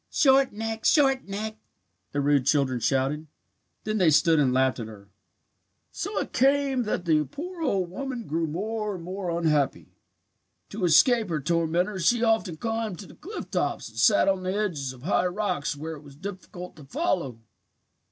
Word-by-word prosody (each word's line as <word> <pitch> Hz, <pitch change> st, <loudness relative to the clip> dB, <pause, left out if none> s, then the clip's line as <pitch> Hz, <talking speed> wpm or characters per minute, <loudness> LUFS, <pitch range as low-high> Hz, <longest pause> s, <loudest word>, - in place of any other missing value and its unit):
"'Short 270 Hz, -1 st, +4 dB
neck! 225 Hz, +1 st, -4 dB
Short 270 Hz, -5 st, +3 dB
neck!' 215 Hz, +2 st, -5 dB, 0.5 s
the 145 Hz, -, -1 dB
rude 140 Hz, -2 st, +2 dB
children 135 Hz, -4 st, +2 dB
shouted. 135 Hz, +5 st, 0 dB, 0.6 s
Then 215 Hz, 0 st, -1 dB
they 180 Hz, -4 st, +5 dB
stood 155 Hz, +1 st, +4 dB
and 135 Hz, -3 st, +3 dB
laughed 130 Hz, 0 st, +2 dB
at 115 Hz, -, -5 dB
her. 100 Hz, -2 st, -13 dB, 0.8 s
"So 405 Hz, +3 st, -4 dB
it -, -, -2 dB
came 270 Hz, -1 st, +2 dB
that 185 Hz, -4 st, -2 dB
the 155 Hz, -2 st, +3 dB
poor 340 Hz, -, -7 dB
old 195 Hz, -, 0 dB
woman 250 Hz, +2 st, -5 dB
grew 165 Hz, +2 st, -1 dB
more 210 Hz, +5 st, -3 dB
and 175 Hz, -, -8 dB
more 185 Hz, +1 st, -4 dB
unhappy. 160 Hz, -5 st, 0 dB, 0.8 s
To 200 Hz, -3 st, -2 dB
escape 205 Hz, -, +5 dB
her 160 Hz, -2 st, -1 dB
tormentors 170 Hz, +4 st, 0 dB
she 240 Hz, +2 st, +3 dB
often 220 Hz, -7 st, +1 dB
climbed 225 Hz, -2 st, -3 dB
to 205 Hz, -, -9 dB
the -, -, -14 dB
cliff 390 Hz, +8 st, -8 dB
tops -, -, -1 dB
and -, -, -17 dB
sat -, -, +5 dB
on 190 Hz, -1 st, +2 dB
the 185 Hz, +1 st, -2 dB
edges 160 Hz, -11 st, -2 dB
of 130 Hz, -1 st, -14 dB
high 180 Hz, +1 st, +2 dB
rocks 180 Hz, -6 st, -2 dB
where 160 Hz, +3 st, -6 dB
it -, -, -13 dB
was 140 Hz, -2 st, -14 dB
difficult 180 Hz, +1 st, -8 dB
to 150 Hz, -, -12 dB
follow. 175 Hz, -, -1 dB
180 Hz, 175 wpm, -26 LUFS, 150-225 Hz, 0.8 s, they